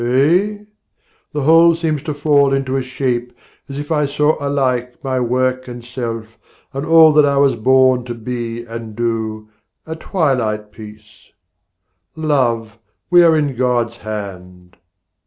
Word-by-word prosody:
Eh? 165 - +2 0.7
the 150 - -3
whole 165 +3 +6
seems 160 -3 -2
to 150 -1 -5
fall 145 -2 +3
into 135 -1 -1
a 135 - 0
shape 125 -2 -3 0.4
As 140 - -6
if 145 +2 -6
I 150 -2 +1
saw 150 +2 +1
alike 130 -3 -1
my 130 -1 -1
work 130 +1 -1
and 120 -1 -9
self 115 -2 -6 0.3
And 135 +3 -4
all 160 -1 +7
that 150 0 +5
I 140 -1 +2
was 140 -2 +3
born 130 +2 +3
to 120 -1 -6
be 120 0 -5
and 115 -2 -8
do, 110 -2 -3 0.4
A 160 - -6
twilight 125 - -1
piece. 105 -1 -14 0.9
Love, 120 -8 -1 0.3
we 175 0 +7
are 165 -2 +5
in 145 -3 -1
God's 120 -2 0
hand. 90 -4 -8
130 Hz, 145 wpm, -17 LUFS, 115-145 Hz, 0.9 s, all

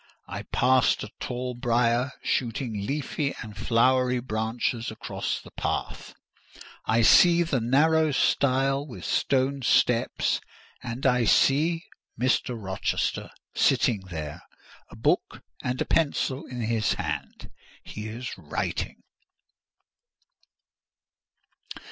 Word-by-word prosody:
I - - -5
passed 130 -1 +2
a 105 - -8
tall 125 0 -4
briar, 120 +1 +1
shooting 115 -4 -2
leafy 145 0 -2
and 105 -2 -10
flowery 125 +3 +2
branches 115 0 -2
across 110 - -4
the - - -14
path; - - -4 0.7
I 115 +1 +3
see 175 +8 +7
the 145 -7 -1
narrow 155 +6 +3
stile 135 0 +2
with 125 - -9
stone 135 +1 +1
steps; 120 -1 +2 0.4
and 120 +3 -5
I 125 -2 +3
see—Mr. 135 -4 +1
Rochester 95 -2 -2 0.2
sitting 110 -4 +2
there, 75 -3 -6 0.5
a - - -13
book - - 0 0.2
and 125 0 -2
a - - 0
pencil 145 -2 0
in 125 -1 -6
his 110 -1 +1
hand; - - -5 0.3
he 105 +1 -7
is 115 +2 -6
writing. 75 -5 -4
125 Hz, 105 wpm, -26 LUFS, 115-135 Hz, 0.7 s, see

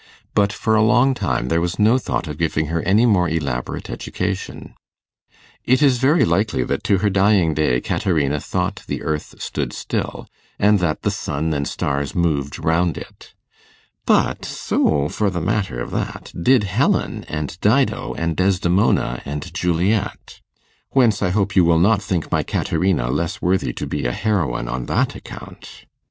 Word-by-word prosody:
But, 100 0 +3
for 110 +1 -1
a 110 - +4
long 125 +5 +4
time, 65 - -1
there 85 0 +2
was 85 +1 -2
no 110 +5 +4
thought 90 - -3
of 75 +1 -6
giving 80 -1 0
her 85 - 0
any 105 +7 +3
more 90 -7 +3
elaborate 70 -6 -3
education. - - -5 0.9
It 130 +4 +3
is 130 -4 +4
very 145 +6 +4
likely 100 - +1
that - - -2
to 100 - +3
her - - +4
dying 95 -4 +3
day 75 -5 +1
Caterina 75 -5 0
thought - - -3
the - - -4
earth 75 -1 -3
stood - - -4
still, - - -4 0.3
and 105 0 +4
that 85 -3 -1
the - - +1
sun 75 +2 -2
and 70 -1 -1
stars 70 -1 -2
moved 75 -5 0
round 85 +1 +1
it; - - -12 0.7
but - - +2
so, 75 -2 0
for 105 +6 0
the 90 -2 -3
matter 95 - -1
of - - -5
that, - - -4
did 120 +6 +3
Helen, 95 -2 0
and 75 +2 -5
Dido, 130 +6 +1
and 85 -1 -2
Desdemona, 90 -8 +1
and 75 +1 -6
Juliet; 90 +4 -1 0.5
whence 115 -6 +3
I 90 - +1
hope 100 +1 0
you 95 - +6
will 85 -1 +4
not 100 +4 +3
think 90 -5 -3
my - - +2
Caterina 90 -11 0
less 80 +5 -2
worthy 90 -7 0
to - - -5
be - - -3
a - - -2
heroine 85 - -1
on 60 0 -4
that - - +1
account. - - -11
85 Hz, 170 wpm, -20 LUFS, 75-105 Hz, 0.9 s, you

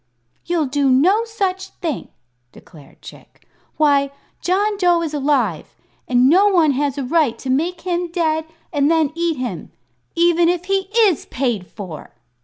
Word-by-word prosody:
"You'll 340 -3 +1
do 280 0 0
no 365 - +3
such 385 -4 -3
thing," 325 -7 -4 0.4
declared 150 -4 -17
Chick. - - -15 0.3
"Why, 285 -2 +3 0.3
John 410 +4 +1
Dough 350 -3 +3
is 310 -2 -4
alive, 270 - -1 0.3
and 250 0 +3
no 375 +8 +5
one 340 -7 +3
has 280 0 -1
a 280 - -2
right 280 -2 +1
to 260 - -4
make 335 +6 -1
him 350 -1 -2
dead 320 -2 0 0.3
and 290 -1 +2
then 320 -3 +2
eat 335 -2 -1
him 240 -10 -5 0.4
even 340 0 +3
if 355 0 -1
he 385 0 -1
is 410 -9 +3
paid 235 -8 -2
for!" 185 -8 -10
315 Hz, 155 wpm, -19 LUFS, 270-355 Hz, 0.4 s, no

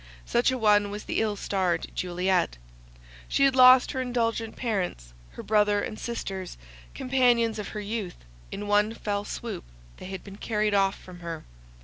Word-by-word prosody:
Such 240 - +2
a 260 - 0
one 205 -3 +4
was 205 +1 -6
the - - -2
ill 215 -2 0
starred 185 -4 -1
Juliet. 180 - 0 0.7
She 275 - +1
had 270 -1 +3
lost 255 0 +7
her 260 - -2
indulgent 230 -3 -1
parents, 180 - -3 0.2
her - - -8
brothers 210 -1 +2
and 215 - -8
sisters, 195 -6 -5 0.4
companions 240 -4 +2
of 210 - -4
her 210 - -6
youth; 205 -3 -4 0.3
in 205 - -5
one 210 +2 +2
fell 205 -2 -2
swoop 215 -6 -5 0.3
they - - -9
had 190 -1 -6
been 200 -1 -11
carried 210 -1 0
off 195 -1 +2
from 180 -1 -12
her. 170 -2 -6
210 Hz, 165 wpm, -27 LUFS, 190-230 Hz, 0.7 s, lost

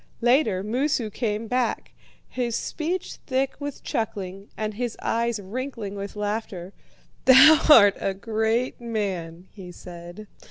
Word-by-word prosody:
Later, 240 -6 +2
Moosu 240 0 -1
came 215 0 -2
back, 250 +1 -1 0.4
his 240 -2 -2
speech 340 +4 -3
thick 265 0 0
with 285 -1 -6
chuckling 195 -3 -4
and 215 0 -3
his 240 +1 -4
eyes 230 -1 -1
wrinkling 225 0 -5
with 200 0 -6
laughter. 205 -3 -4 0.5
"'Thou 265 +4 +8
art 205 -9 +8
a 195 - -2
great 220 +4 -1
man,' 190 -7 -4
he 185 -4 -10
said. 175 +3 -10
220 Hz, 125 wpm, -24 LUFS, 195-250 Hz, 0.5 s, Thou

